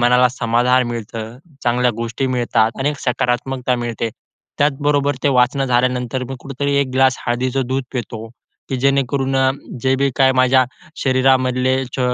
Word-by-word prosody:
मनाला 125 +1 +4
समाधान 125 +1 +1
मिळतं. 115 0 -6 0.3
चांगल्या 125 +1 +2
गोष्टी 115 +3 -2
मिळतात 120 -3 +1
आणि 135 +2 +1
एक 145 - -7
सकारात्मकता 125 +1 0
मिळते. 115 -1 -3 0.5
त्याचबरोबर 145 0 +1
ते - - +3
वाचणं 130 +1 +2
झाल्यानंतर 125 0 0
मी 135 - -5
कुठेतरी 140 +2 -3
एक 140 - -1
ग्लास 130 -1 +4
हळदीचं 130 +2 0
दूध 130 +1 -2
पितो 115 -3 -5 0.4
की 135 - -2
जेणेकरून 135 0 +1
अ, 130 0 +3 0.3
जे 130 0 +2
बी 140 0 +1
काय 130 -1 +4
माझ्या 130 0 +4 0.4
शरीरामधले 130 -1 +2 0.2
छ - - -2
130 Hz, 150 wpm, -19 LUFS, 120-135 Hz, 0.5 s, मनाला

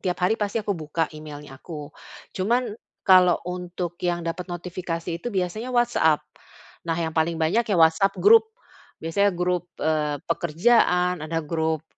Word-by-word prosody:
tiap 180 -1 -2
hari 220 +5 +2
pasti 205 +1 -1
aku 210 -1 -1
buka 160 -2 -2
email-nya 150 -2 -10
aku. 150 -3 -8 0.4
Cuman, 235 +5 0 0.3
kalau 180 -2 +6
untuk 180 -1 -5
yang 175 -1 -1
dapat 170 +2 -4
notifikasi 175 -1 -5
itu 240 - -4
biasanya 200 +3 -2
WhatsApp. 240 -11 +2 0.6
Nah 165 - +1
yang 165 -1 -2
paling 160 +1 0
banyak 165 +9 +1
ya 200 - +2
WhatsApp 165 +4 +4
grup, 445 +1 +6 0.5
biasanya 200 +6 +2
grup, 180 0 -1
eee, 155 -2 0
pekerjaan, 180 +1 +2
ada 165 0 -3
grup 160 0 -1
175 Hz, 145 wpm, -24 LUFS, 160-190 Hz, 0.6 s, kalau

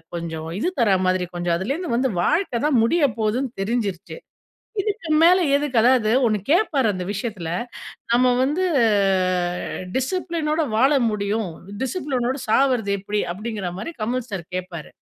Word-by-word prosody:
கொஞ்சம் 160 -1 -5
இது 355 - 0
தர 200 -5 +4
மாதிரி, 185 -1 +1
கொஞ்சம் 175 -1 0
அதுலேருந்து 270 - -2
வந்து 260 0 +1
வாழ்க்க 315 - 0
தான் 275 -6 +3
முடிய 300 +6 +3
போதுன்னு 230 +4 0
தெரிஞ்சிரிச்சு. 200 - -3 0.6
இதுக்கு 405 -3 -4
மேல 360 +3 +6 0.2
எதுக்கு 285 -3 -1
அதாவது 240 -2 +4
1 215 -2 +2
கேப்பார் 310 - +3
அந்த 185 -2 -4
விஷயத்துல, 205 -5 -4 0.6
நம்ம 245 +2 +4 0.2
வந்து 300 +8 0 1.3
டிசிப்ளினோட 320 +2 -1
வாழ 255 +5 +4 0.2
முடியும் 210 0 -1 0.3
டிசிப்ளினோடு 265 -3 -2
சாகறது 245 -4 +2
எப்படி 205 +2 -2
அப்டிங்கிற 210 -1 -4
மாரி 330 - -5
கமல் 245 +2 -2
சார் 190 -4 -4
கேப்பாரு. 180 -4 -6
235 Hz, 130 wpm, -22 LUFS, 200-280 Hz, 1.3 s, மேல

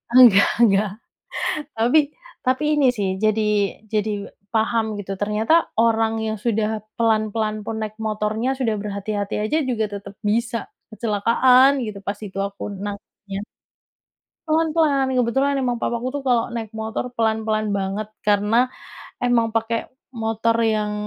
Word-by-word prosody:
enggak 230 -6 +8 0.2
enggak, 205 -1 +4 0.9
tapi 235 +6 +3 0.5
tapi 260 +3 +1
ini 290 -2 +3
sih 200 -2 0 0.2
jadi 215 0 +3 0.5
jadi 215 0 +1 0.4
paham 225 0 +2
gitu, 195 -1 -6
ternyata 215 +7 +1 0.3
orang 225 -1 +3
yang 220 0 -1
sudah 220 -2 +1 0.3
pelan-pelan 215 -1 +1
pun 225 - -3
naik 215 0 -4
motornya, 215 +3 -1
sudah 225 -4 +1
berhati-hati 205 0 -3
aja 300 +9 +1
juga 220 -3 0
tetap 200 0 -8
bisa 235 +2 0 0.3
kecelakaan 235 +4 +4
gitu, 210 -3 -5
pas 200 0 -2
itu 195 - -11
aku 200 0 -10 0.2
nangkapnya. 200 -1 -7 1.1
Pelan-pelan, 310 -4 +2
kebetulan 270 +4 +2
emang 245 -3 0
papa 235 - 0
aku 245 +2 -4
tuh 285 - -2
kalau 235 -2 +3
naik 225 -2 -4
motor 220 +3 -3
pelan-pelan 220 -2 0
banget, 200 +2 -2
karena 210 +4 +2 0.5
emang 235 -2 +2
pakai 225 0 -1 0.3
motor 225 0 0
yang, 215 -1 +1
220 Hz, 130 wpm, -22 LUFS, 210-235 Hz, 1.1 s, enggak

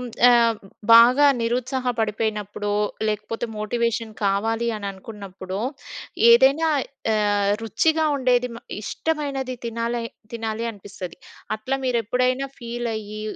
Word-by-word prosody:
హ్మ్, 250 - -5 0.2
ఆహ్ 235 -2 +4 0.4
బాగా 250 +5 +8
నిరుత్సాహ 250 +3 -1
పడిపోయినప్పుడో, 210 -1 -2 0.4
లేకపోతే 215 +2 -3
మోటివేషన్ 230 +1 -1
కావాలి 225 +4 +1
అననుకున్నప్పుడో, 195 -1 -7 0.7
ఏదైనా 270 +7 +5 0.4
ఆహ్! 205 -1 +2
రుచిగా 315 - +1
ఉండేది 250 -2 +2
మ - - -7 0.2
ఇష్టమైనది 280 -1 -2
తినా‌లై 235 0 -2 0.3
తినాలి 225 0 -3
అనిపిస్తది. 195 -4 -9 0.4
అట్ల 215 +5 -6
మీరెప్పుడైనా 250 +3 0
ఫీలయ్యి, 225 -3 -4
230 Hz, 95 wpm, -23 LUFS, 210-250 Hz, 0.7 s, బాగా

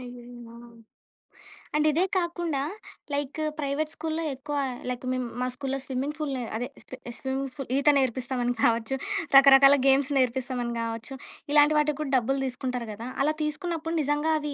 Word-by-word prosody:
అయ్యయ్యో! 245 -1 -11 1.2
అండ్ 300 0 +2
ఇదే 330 +5 +2
కాకుండా 345 -5 -1 0.5
లైక్ 285 +1 -2 0.2
ప్రైవేట్ 295 +2 -1
స్కూల్‌లో 320 +1 -3
ఎక్కువ 285 +2 -5 0.3
లైక్ 250 0 -4
మేము 255 -1 -2
మా 250 - +1
స్కూల్‌లో 270 +1 -3
స్విమ్మింగ్ 270 +3 -3
పూల్ 300 -3 -2
నే 250 - -3
అదే 245 +2 -3 0.5
స్విమ్మింగ్ 265 0 -3
పూల్ 275 -4 -7
ఈత 280 +2 +4
నేర్పిస్తామని 250 -1 -1
కావచ్చు, 230 +3 +2 0.4
రకరకాల 275 0 +8
గేమ్స్ 270 +1 +3
నేర్పిస్తామని 250 -1 0
గావచ్చు, 230 +3 -5 0.4
ఇలాంటి 295 +1 +6
వాటికి 300 -1 +1
గూడా 275 -2 -3
డబ్బులు 270 +3 0
దీసుకుంటారు 250 -2 -3
గదా! 230 +4 -7 0.2
అలా 305 - +2
తీసుకున్నప్పుడు 325 +2 -3
నిజంగా 295 +2 +1
అవి 295 -1 -4
270 Hz, 145 wpm, -27 LUFS, 250-295 Hz, 1.2 s, రకరకాల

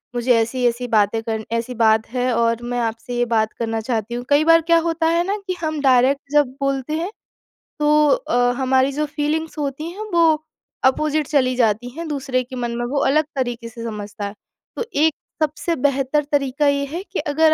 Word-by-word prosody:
मुझे 240 +1 +2
ऐसी-ऐसी 240 +1 0
बातें 220 0 +2
करनी 220 -1 -3
ऐसी 235 +2 -2
बात 220 -1 +3
हैं 250 0 0
और 230 0 +1
मैं 245 0 -2
आपसे 230 +1 -3
ये 245 - +2
बात 220 -2 0
करना 225 -1 -1
चाहती 225 -1 -2
हूँ। 245 +1 -3
कई 290 +2 +4
बार 330 0 +6
क्या 335 +1 +3
होता 325 0 +1
है 335 +1 +2
न 420 - 0
कि 370 - 0
हम 310 -2 -2
डायरेक्ट 265 +1 +4
जब 295 -3 +5
बोलते 275 +1 -1
हैं 355 +4 -2 0.7
तो 300 0 +4
अ, 245 - +2
हमारी 265 0 +2
जो 300 +2 -1
फ़ीलिंग्स 305 +2 -2
होती 295 +2 -3
हैं 430 +4 -7
वो 320 -2 +4 0.4
अपोजिट 300 +2 +2
चली 255 -4 +2
जाती 230 0 +1
हैं, 325 +6 -7
दूसरे 270 -3 -1
के 255 +1 -10
मन 240 -1 -2
में 240 - -2
वो 275 +3 -1
अलग 305 +3 +3
तरीक़े 240 -3 -3
से 230 0 -9
समझता 210 -2 -5
है। 200 - -5 0.4
तो 475 - -3
एक 310 +2 +3 0.3
सबसे 310 +3 -1
बेहतर 275 +1 +1
तरीका 285 +1 +1
ये 280 0 +2
है 335 +7 -5
कि 395 - -5
अगर 310 +2 +3
265 Hz, 200 wpm, -21 LUFS, 240-300 Hz, 0.7 s, बार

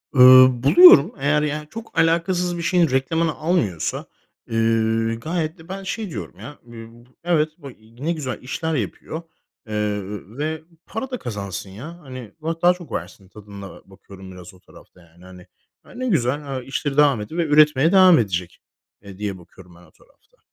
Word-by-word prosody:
Iıı, 130 -1 +7
buluyorum. 175 - +8
Eğer, 150 +2 +1
yani, 150 0 -3
çok 225 -5 -10
alakasız 175 +2 +1
bir - - -4
şeyin 170 -2 +2
reklamını 155 +5 0
almıyorsa, 125 - -2 0.5
ııı, 115 0 0
gayet 160 +3 -3
de 160 +2 -17
ben 195 +1 -6
şey 210 +1 -5
diyorum - - -8
ya. 145 - -11
Iıı, 115 0 -13 0.2
evet, 160 -3 +1
b 140 - -11 0.4
ne 170 - +1
güzel 135 -6 -5
işler 160 +5 -4
yapıyor, 140 - -5 0.5
eee, 105 -1 -2 0.4
ve 155 +1 -3 0.2
para 260 +4 -6
da 250 - -4
kazansın 100 - -6
ya. 155 - -10
Hani, 130 -6 -10
va 165 +1 -4
daha 175 +1 +5
çok 175 -2 -13
versin 95 -2 -7
tadında 100 -1 -12
bakıyorum 95 0 -14
biraz 90 0 -12
o 95 - -19
tarafta, 90 - -19
yani, 85 +1 -21
hani. 90 -1 -14 0.4
Ya, - - -17
ne 255 +1 -5
güzel, 140 - -1
he, - - -15
işleri 140 +1 -4
devam 140 -7 +4
ediyor 160 +12 -6
ve - - 0
üretmeye 150 0 +4
devam 185 -3 +6
edecek, 90 -5 -3 0.4
eee, 100 -2 -12
diye 100 -2 -4
bakıyorum 90 0 -17
ben 85 - -18
o 85 -3 -21
tarafta. - - -29
135 Hz, 170 wpm, -21 LUFS, 105-165 Hz, 0.5 s, buluyorum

